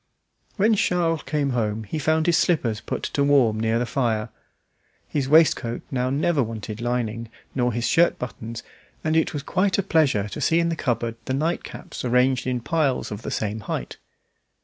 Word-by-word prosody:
When 215 +3 +4
Charles 170 -5 +1
came 145 -3 -1
home 110 -3 -1
he 130 +10 -4
found 155 +2 +1
his 170 - +3
slippers 120 -12 +1
put - - -4
to 140 - 0
warm 130 -7 +3
near 110 +1 +1
the 120 - 0
fire. 115 -3 -1 0.8
His 135 -3 -2
waistcoat 150 -6 +3
now 125 -1 0
never 145 +2 +1
wanted 110 -1 -5
lining, 115 -2 -2 0.2
nor 125 -2 +1
his 120 0 -1
shirt 170 +1 +3
buttons, 115 -2 -6 0.4
and 155 0 +1
it 160 - +2
was 145 -2 -4
quite 185 +5 +1
a 200 - +1
pleasure 145 - +2
to - - -6
see 165 - +3
in 170 0 +1
the 165 - -1
cupboard 115 -5 -2
the 130 - -1
night 160 +5 -1
caps - - -8
arranged 125 +1 +2
in 125 -1 -1
piles 145 -3 0
of 105 +1 -5
the - - -5
same 110 0 -2
height. - - -5
130 Hz, 185 wpm, -24 LUFS, 115-160 Hz, 0.8 s, When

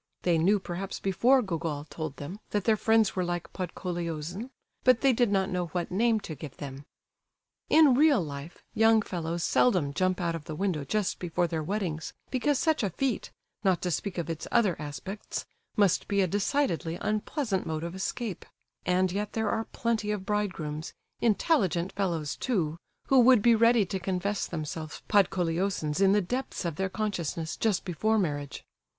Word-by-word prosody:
They 170 -2 +3
knew, 195 +6 +4
perhaps, 185 0 -5
before 245 +7 +3
Gogol 165 -6 -3
told 155 -3 -5
them, 170 +10 -7
that 205 -2 0
their 220 +1 +4
friends 220 0 +3
were 185 - +1
like 175 -1 -3
Podkoleosin, 175 - -4 0.3
but 255 -2 +5
they 270 -2 +5
did 240 -2 +2
not 195 -1 +1
know 180 -1 -1
what 175 +1 -3
name 225 +3 +3
to 160 - -6
give 145 -1 -9
them. 140 -1 -7 0.8
In 310 -4 +7
real 290 +1 +5
life, 145 -1 -6
young 225 -1 +5
fellows 170 -2 -3
seldom 180 -13 +3
jump 185 +4 +1
out 170 -2 0
of 165 -2 -6
the 155 - -5
window 180 -5 -1
just 200 +8 -1
before 175 0 0
their 165 -2 -2
weddings, 165 -2 -3 0.2
because 275 +2 +1
such 315 +1 +2
a 205 - 0
feat, 255 +6 -2 0.3
not 190 -3 +3
to 180 - 0
speak 185 +4 -2
of 170 - -2
its 165 -1 -4
other 210 -8 +3
aspects, 170 +8 -5 0.3
must 200 -4 +3
be 200 -1 +2
a - - +4
decidedly 190 - 0
unpleasant 215 -1 -1
mode 160 0 -2
of 170 0 -4
escape; 195 +2 -3 0.4
and 180 0 +2
yet 205 +2 -3
there 220 -2 0
are 225 0 -1
plenty 220 -2 -1
of 205 -3 -2
bridegrooms, 175 -7 -2 0.2
intelligent 195 - +2
fellows 170 -7 -1
too, 175 -12 -1 0.3
who 270 - +6
would 245 -3 +6
be 235 - +6
ready 230 -1 +5
to 190 +1 -3
confess 190 +2 -1
themselves 155 -1 -5
Podkoleosins 180 -3 +1
in 195 -1 +6
the 205 +1 +4
depths 245 +2 -3
of 165 -3 -2
their 190 0 0
consciousness, 170 -6 -2
just 215 -5 0
before 215 +5 +1
marriage. 145 -7 -2
190 Hz, 175 wpm, -28 LUFS, 165-215 Hz, 0.8 s, In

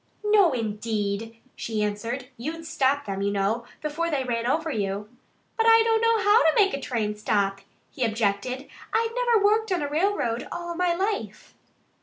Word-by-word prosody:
"No, 415 -5 +5
indeed!" 220 -1 -3 0.2
she 220 -2 -2
answered. 230 +5 -3
"You'd 315 +7 -6
stop 285 -2 +1
them, 195 -1 -3
you 200 - +1
know, 205 +4 0 0.2
before 315 +3 -1
they 285 -4 0
ran 235 -2 -2
over 315 +4 0
you." 205 -2 -3 0.5
"But 450 0 +2
I 455 0 +7
don't 450 -1 +2
know 460 0 +4
how 415 +4 +6
to 320 - +3
make 400 -2 +4
a 275 - -3
train 215 -5 -2
stop," 200 -2 0 0.3
he 260 - -3
objected. 225 +4 -1 0.2
"I've 455 0 +1
never 480 -4 +2
worked 435 0 +2
on 355 -5 +1
a - - -1
railroad 295 - 0
in - - -9
all 345 0 -4
my 350 0 +1
life." 400 +3 -3
270 Hz, 180 wpm, -25 LUFS, -, 0.5 s, I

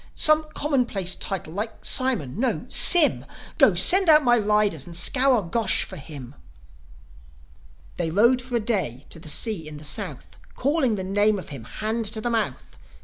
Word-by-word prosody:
Some 310 0 +4
commonplace 240 - -1
title, 185 -5 -5
like 215 +3 -7
Simon? 225 - +1
No 260 - -2
Sym! 340 -5 +5 0.4
Go, - - +4
send 380 -1 +6
out 305 -1 +5
my 240 -2 +3
riders, 210 - -1
and 170 -1 -7
scour 255 +4 +2
Gosh 190 +3 -1
for 190 - -11
him." 140 -4 -11 1.6
They 170 -2 -3
rode 235 +9 +2
for 245 0 -6
a - - +1
day 190 - -4
to 165 - -9
the 155 - -8
sea 185 -2 0
in 150 -1 -10
the 150 - -13
South, - - -3 0.2
Calling 270 -4 -1
the 190 - -5
name 205 +2 0
of 185 - -10
him, 135 -6 -10
hand 220 - -5
to 220 +1 -5
the 240 +2 -4
mouth. 225 -2 -5
215 Hz, 170 wpm, -22 LUFS, 170-250 Hz, 1.6 s, send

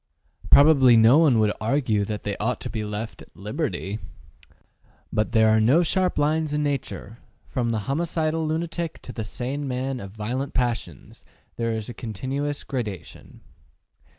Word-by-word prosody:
Probably 140 -5 +7
no 115 +7 +7
one 145 -8 +5
would 105 -1 +3
argue 110 -3 +1
that 105 0 -5
they 100 -1 -2
ought 115 +3 -1
to - - -5
be 110 - -3
left 105 +2 -5
at - - -17
liberty. 105 - -3 1.1
But 110 0 0
there 110 -2 +4
are 110 0 +4
no 130 +11 +4
sharp 185 +2 0
lines 150 +1 +1
in 150 0 0
nature; 135 -5 -4 0.3
from 120 -2 -1
the 110 -2 -1
homicidal 160 +1 -1
lunatic 165 +1 -3
to 125 - -8
the 110 - -4
sane 135 +6 -4
man 130 0 -2
of 100 - -7
violent 120 +7 -4
passions 120 - -3 0.3
there 115 -1 -1
is 110 -2 -3
a 120 - -6
continuous 135 +7 -4
gradation. 110 - -6
125 Hz, 155 wpm, -24 LUFS, 110-145 Hz, 1.1 s, Probably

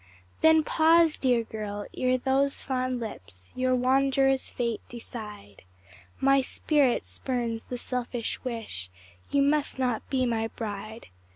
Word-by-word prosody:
Then 320 0 +6
pause, 325 0 +4
dear 245 -3 +2
girl! 210 -2 -5
ere 255 0 +2
those 270 +2 +2
fond 255 -1 -2
lips 95 - -9
Your 255 0 +2
wanderer's 270 +1 +2
fate 235 -3 -2
decide; 210 - -9 0.6
My 275 0 +4
spirit 275 -1 +1
spurns 235 -3 -3
the 250 - -5
selfish 245 -1 -3
wish 225 - -5 0.4
You 280 -1 +3
must 290 0 +1
not 250 -4 0
be 260 -2 +1
my 225 -2 0
bride. 215 0 -7
250 Hz, 125 wpm, -27 LUFS, 225-270 Hz, 0.6 s, Then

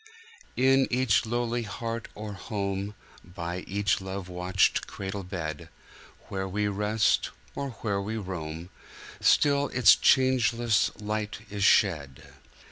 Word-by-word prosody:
In 135 +1 +4
each 125 -3 +2
lowly 120 +1 -1
heart 115 +1 -5
or 105 0 -6
home, 100 0 -4 0.3
By 90 0 -5
each 100 0 0
love 95 -1 -6
watched 90 +1 +1
cradle 100 0 -5
bed, 85 -5 -5 0.6
Where 95 -1 -3
we 105 +2 -1
rest, 105 +2 +1 0.2
or 140 - -4
where 100 -3 0
we 110 +3 -3
roam, 85 -3 -6 0.5
Still 145 -1 +4
its 125 -5 +6
changeless 120 -3 +3
light 105 0 -3
is 100 -1 -2
shed. 75 - +3
105 Hz, 120 wpm, -27 LUFS, 95-115 Hz, 0.6 s, its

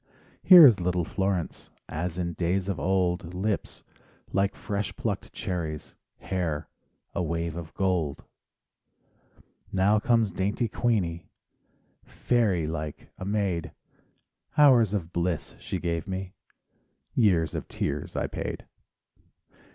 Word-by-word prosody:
Here 180 -4 +10
is 115 -8 +7
little 90 0 0
Florence, 95 -2 -2 0.2
As 85 +2 -3
in 85 -1 -2
days 90 +3 0
of 100 -3 -2
old: 90 -2 0
Lips 100 +2 -2 0.2
— - - -28
like 100 +1 +1
fresh 100 -1 -3
plucked 115 -7 -3
cherries, 80 -6 -4 0.2
Hair—a 85 -2 -5
wave 85 -1 -2
of 85 -2 -7
gold. 90 -7 0 1.5
Now 100 +3 +3
comes 115 -2 +2
dainty 100 +6 -1
Queenie, 100 -8 -1 0.8
Fairy 105 -9 +1
like 75 -1 -5
a 95 - -5
maid; 100 -5 -1 0.8
Hours 120 -8 +6
of 85 -4 -4
bliss 85 -1 -2
she - - -4
gave 85 -2 -2
me, 95 -1 -4 0.8
Years 90 - +3
of - - -4
tears - - -3
I - - 0
paid. - - -5
95 Hz, 115 wpm, -27 LUFS, 85-100 Hz, 1.5 s, Here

